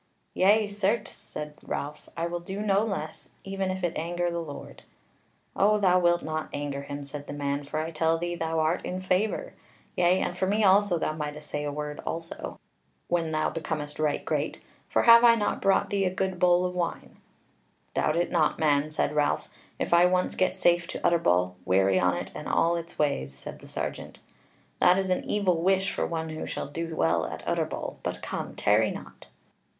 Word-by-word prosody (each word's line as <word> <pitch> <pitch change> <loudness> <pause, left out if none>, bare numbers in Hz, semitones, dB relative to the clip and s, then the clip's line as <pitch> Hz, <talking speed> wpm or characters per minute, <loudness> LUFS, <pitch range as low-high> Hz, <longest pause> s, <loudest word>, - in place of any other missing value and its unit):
"Yea, 205 +3 +4
certes," 205 +2 -1
said 150 0 -8
Ralph, 150 +1 -5
"I 165 - 0
will 175 0 -3
do 190 +3 -6
no 200 -2 +2
less, 175 -8 -5
even 195 -1 -2
if 185 0 -3
it 175 - 0
anger 175 +2 -1
the 170 0 -2
Lord." 145 -4 -9 0.7
"O 210 +2 +4
thou 185 -3 +4
wilt 175 -1 +3
not 155 0 -3
anger 145 -1 -3
him," 145 +1 -6
said 145 +1 -8
the - - -5
man, 140 0 -2
"for 155 +2 -3
I 160 +1 -3
tell 160 +1 +1
thee, 175 +1 -3
thou 165 -1 -2
art 160 +3 +1
in 185 - -3
favour. 185 +3 0 0.4
Yea, 180 +1 +3
and 175 - -2
for 190 - 0
me 210 +3 +2
also 195 -2 +5
thou 155 - -1
mightest 150 -1 -6
say 145 0 -2
a 145 - -2
word 150 0 -5
also, 165 0 -5 0.5
when 165 -2 0
thou 155 0 0
becomest 155 -2 -4
right 150 -1 0
great; - - -1 0.3
for - - +2
have 235 0 +8
I 235 -1 +8
not 210 -2 -1
brought 195 0 +2
thee 200 -1 +1
a - - +3
good 185 0 -2
bowl 180 0 +4
of 180 - -2
wine?" 175 -2 -3 0.8
"Doubt 155 - +1
it 175 +1 0
not, 160 -4 +2
man," 150 -1 +2
said 155 -1 -1
Ralph, 150 -1 +1 0.3
"if - - -1
I 175 +1 +7
once 180 0 +1
get 185 0 +1
safe 175 0 +2
to - - -5
Utterbol: 90 - +2
weary 95 +1 +3
on 90 -1 +2
it - - -5
and - - -7
all 170 +1 +2
its 170 0 -6
ways!" 65 - 0
Said - - -9
the - - -14
sergeant: - - -5 0.6
"That 180 +1 +5
is 190 -1 0
an 185 - +1
evil 185 -5 +1
wish 190 +2 +2
for - - -1
one 160 -1 -3
who 155 0 -5
shall - - -4
do 165 +2 -4
well 80 - +2
at - - -7
Utterbol. - - -2
But - - -4
come, - - -4
tarry - - +3
not." - - -9
170 Hz, 200 wpm, -27 LUFS, 150-185 Hz, 0.8 s, have